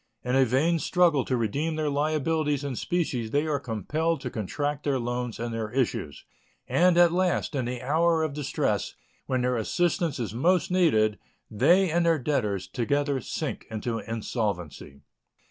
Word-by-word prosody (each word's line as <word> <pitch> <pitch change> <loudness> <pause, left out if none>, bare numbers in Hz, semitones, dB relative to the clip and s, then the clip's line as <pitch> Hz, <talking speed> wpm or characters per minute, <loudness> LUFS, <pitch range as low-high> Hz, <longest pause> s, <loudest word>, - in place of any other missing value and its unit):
In 125 +1 0
a 135 0 +5
vain 150 +8 +2
struggle 165 -5 +3
to 130 - 0
redeem 140 +9 -1
their 155 -1 -1
liabilities 150 0 0
in 140 -3 -3
specie 150 -8 -1
they 145 +6 +1
are 150 -2 0
compelled 150 - -1
to 125 - -5
contract 145 +7 -3
their 140 -2 +1
loans 120 -1 -3
and 120 0 -3
their 110 -2 -3
issues, 115 - -2 0.4
and 180 0 +3
at 175 -1 +6
last, 180 -2 0
in 130 -4 -1
the 125 0 -4
hour 160 +4 +2
of 155 -3 -2
distress, 145 -2 -1 0.3
when 130 -1 0
their 125 0 +1
assistance 170 - 0
is 110 -4 -3
most 170 +7 +2
needed, 110 - +3 0.3
they 170 - +4
and 170 +1 +2
their 165 -1 +4
debtors 105 -10 -1
together 140 +6 -1
sink - - -4
into 115 +1 -3
insolvency. 100 - -4
140 Hz, 165 wpm, -27 LUFS, 115-160 Hz, 0.4 s, at